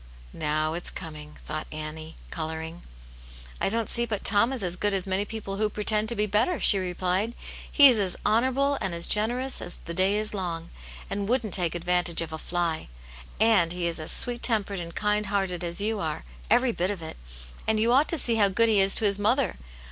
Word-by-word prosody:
"Now 155 +1 -1
it's 175 - -2
coming!" 150 -3 -9
thought 155 0 -5
Annie, 155 +1 -7 0.2
colouring. 160 +1 -5 0.8
"I - - +1
don't 225 +1 -1
see 235 0 -1
but 210 -3 -3
Tom 225 +4 +4
is 255 -6 0
as 180 -1 0
good 205 +2 0
as 190 - -2
many 190 +1 -1
people 205 -2 -6
who 215 0 +1
pretend 210 +1 0
to 235 - -2
be 210 0 +1
better," 215 - +1
she 200 - +5
replied. 185 +4 -1 0.2
" - - -13
He 285 -2 +8
is 245 -5 +4
as 190 -3 -1
honourable 260 +6 +2
and 180 -3 -2
as 170 - +3
generous 245 +5 0
as 175 - -7
the 170 - -5
day 190 +3 +2
is 215 0 -2
long, 170 -4 -4 0.4
and 200 +1 -3
wouldn't 230 -6 0
take 175 -3 +2
advantage 175 0 0
of 160 -1 -5
a 160 - -5
fly. 170 - -2 0.5
And 205 -7 +3
he 180 -1 -3
is 170 -1 -2
as 155 - -3
sweet 240 -1 0
tempered 205 -4 0
and 170 -1 -7
kind 210 0 0
hearted 190 -3 -2
as 170 +2 -2
you 215 +1 -1
are, 160 -4 -3 0.3
every 245 0 +4
bit 185 -4 -1
of 195 -5 -5
it. 160 - -7 0.5
And 220 -1 +2
you 230 +2 +3
ought 280 +4 +4
to 335 - +1
see 235 -5 +2
how 205 -2 +4
good 230 +4 +3
he 210 -2 +4
is 195 0 +4
to 220 - +5
his 200 0 +2
mother 240 +6 +1
195 Hz, 215 wpm, -26 LUFS, 170-220 Hz, 0.8 s, He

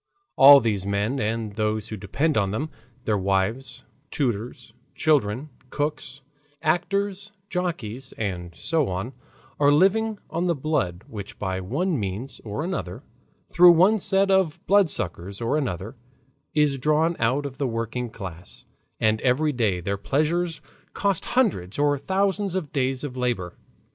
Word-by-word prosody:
All 140 +1 +10
these 110 -6 -1
men 100 +7 -1
and 110 0 -2
those 110 0 -1
who 110 - -4
depend 140 +11 -1
on 100 -3 +2
them, 145 +10 -3 0.3
their 105 -2 +1
wives, 100 +8 -1 0.3
tutors, 120 -4 -3 0.2
children, 140 -2 +1 0.2
cooks, 145 -1 -3 0.4
actors, 200 +5 -1 0.2
jockeys, 135 - -4
and 90 -5 -4
so 160 - 0
on, 95 +8 -4 0.5
are 145 0 +5
living 205 +7 +3
on 170 +3 -1
the 170 - +2
blood 110 - -1
which 100 -2 -8
by 95 -2 -2
one 150 - -1
means 105 +7 -5
or 110 +7 -4
another, 100 - -4 0.5
through 175 0 +8
one 190 +6 +4
set 195 +1 +2
of 190 -5 +2
blood 200 -3 +4
suckers 95 - -3
or 115 +4 0
another, 110 - -3 0.6
is 150 -3 +2
drawn 155 +5 +2
out 130 +6 +1
of 135 -1 -7
the 140 - +1
working 115 +1 -3
class, 90 -5 -9 0.3
and 110 0 +2
every 140 +4 +2
day 110 -9 0
their 100 +3 -2
pleasures 155 - 0 0.3
cost 200 -3 0
hundreds 110 - +1
or 145 0 +3
thousands 195 +4 0
of 165 -7 -3
days 130 -1 0
of 135 -4 -5
labor. 120 -9 -2
135 Hz, 145 wpm, -24 LUFS, 105-160 Hz, 0.6 s, All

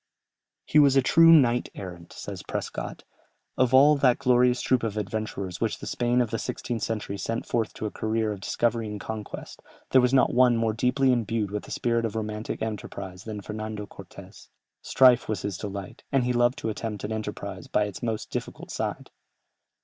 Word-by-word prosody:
"He 155 - +4
was 140 -2 +6
a 135 - +5
true 165 +5 +6
knight 125 -7 +5
errant," 90 -3 -9
says - - -7
Prescott; - - -5 0.5
"of 130 -1 +2
all 140 +3 +7
that 130 -3 +4
glorious 125 -2 +3
troop 130 -1 +2
of 110 -2 -3
adventurers 100 -3 -4
which 115 -2 0
the - - -9
Spain 120 +1 +1
of 115 -3 -1
the 115 - -1
sixteenth 120 -3 -4
century 105 -2 -3
sent 115 +4 -3
forth 115 -3 -1
to - - -5
a 105 - -3
career 110 0 -1
of 100 - -5
discovery 115 +3 0
and 105 -1 -5
conquest, 110 0 -7 0.3
there 130 - +6
was 125 0 +2
not 135 -1 +4
one 125 -1 +5
more 115 -1 +1
deeply 125 +4 +2
imbued 115 -4 0
with 105 0 -4
the - - -13
spirit 115 -1 0
of 110 -2 -3
romantic 110 0 -4
enterprise 95 -4 -6
than 105 -2 -5
Fernando 110 0 -5
Cortès. - - -13 0.3
Strife 125 -3 +4
was 105 -4 -2
his 100 -2 -2
delight, 100 -1 -7
and 135 -2 +3
he 125 0 0
loved 120 +1 +2
to 115 - -3
attempt 105 -2 -4
an 105 - -3
enterprise 110 0 -5
by 105 - +2
its 100 -2 -5
most 115 -2 -3
difficult - - -5
side."... - - -4
115 Hz, 190 wpm, -26 LUFS, 105-125 Hz, 0.5 s, all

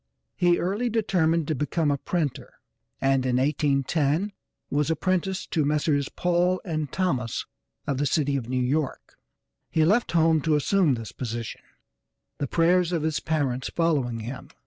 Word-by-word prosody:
He 175 -1 +3
early 205 +7 -1
determined 170 -8 +1
to 155 - 0
become 150 +2 0
a 140 - +1
printer 160 -5 -3 0.4
and, 135 -1 +2
in 125 -1 +1
1810, 145 +5 +1 0.4
was 145 +2 +1
apprenticed 185 +3 -1
to 160 -3 +2
Messrs. 145 -1 +1
Paul 180 +1 +1 0.2
& 150 -4 -3
Thomas 130 - -1 0.4
of 140 -3 -1
the 145 - +1
city 145 -1 +1
of 125 -3 -3
New 130 0 0
York. 140 +3 -2 0.5
He 160 -1 +2
left 210 +5 +2
home 160 -2 +4
to 155 0 +2
assume 155 -1 +3
this 115 -4 -7
position, 115 -2 -5 0.8
the 145 - -1
prayers 175 +3 +3
of 165 -3 0
his 155 -1 0
parents 140 -5 -1
following 140 -9 0
him. 125 +4 -7
155 Hz, 150 wpm, -26 LUFS, 135-175 Hz, 0.8 s, home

